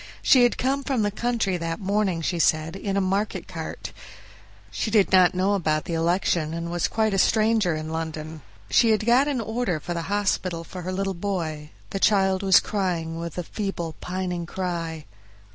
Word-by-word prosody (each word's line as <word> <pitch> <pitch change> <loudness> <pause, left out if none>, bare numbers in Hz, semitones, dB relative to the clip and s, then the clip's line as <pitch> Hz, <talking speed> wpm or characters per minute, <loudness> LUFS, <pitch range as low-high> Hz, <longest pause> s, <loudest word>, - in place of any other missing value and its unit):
She 260 - +6
had 245 -1 +3
come 275 +2 0
from 265 -6 0
the 205 - 0
country 215 -4 -1
that 165 +1 -3
morning, 195 -4 0
she 175 +1 -1
said, 155 +1 +2
in 195 0 -2
a - - +3
market 195 +3 -1
cart; - - -7 0.8
she - - -2
did 210 -3 +3
not 185 -1 +5
know 190 +2 +2
about 155 -6 0
the 170 - -4
election, 165 -1 0
and 170 0 -4
was 175 -1 0
quite 220 -2 0
a 195 - +2
stranger 215 -5 +3
in 155 0 -5
London. 160 -1 -5 0.3
She 230 - +5
had 215 -1 +2
got 250 +4 +4
an 280 -4 0
order 220 -6 -1
for 175 - -5
the 170 - -2
hospital 190 -4 0
for 180 +2 -8
her 180 +1 -4
little 195 +1 -1
boy. 170 -5 -3 0.2
The 195 - -2
child 190 -2 +3
was 190 -2 +6
crying 170 -5 -2
with 170 -1 -6
a 180 - -2
feeble, 175 -4 -4
pining 180 -2 -3
cry. 170 -4 -4
185 Hz, 190 wpm, -25 LUFS, 165-205 Hz, 0.8 s, She